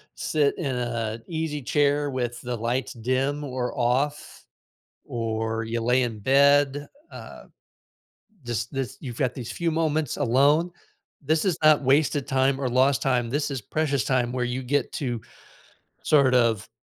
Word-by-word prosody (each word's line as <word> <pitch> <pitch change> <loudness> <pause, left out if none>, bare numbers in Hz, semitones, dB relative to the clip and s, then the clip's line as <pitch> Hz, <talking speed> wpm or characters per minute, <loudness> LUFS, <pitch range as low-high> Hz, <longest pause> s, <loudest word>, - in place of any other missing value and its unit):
sit 145 -2 0
in 140 -7 -2
a 115 -2 -3
easy 160 -3 -3
chair 145 +2 +1
with 125 -2 -3
the 125 -1 -4
lights 120 +1 -2
dim 130 +5 -1
or 130 -3 -4
off, 130 +5 -1 0.6
or 110 -1 -2
you 115 +1 -3
lay 125 +2 +2
in 115 -3 -4
bed, 140 +3 +3 0.2
uh, - - -10 1.0
just 120 0 -3
lis 135 -3 -4
you've 125 -5 -7
got 130 -3 0
these 125 -4 -6
few 170 -1 -1
moments 155 -3 0
alone, 145 +8 +3 0.5
this 155 +2 +1
is 185 -5 +1
not 155 -1 +5
wasted 140 +1 +2
time 135 +1 +1
or 130 - 0
lost 130 +2 +3
time, 125 -3 0
this 145 +3 -1
is 135 -3 -3
precious 140 0 -1
time 125 -2 0
where 125 -1 -1
you 125 +2 -3
get 135 +1 0
to 120 -5 -3 0.8
sort 140 -4 +4
of 115 -5 +2
130 Hz, 155 wpm, -25 LUFS, 120-145 Hz, 1.0 s, not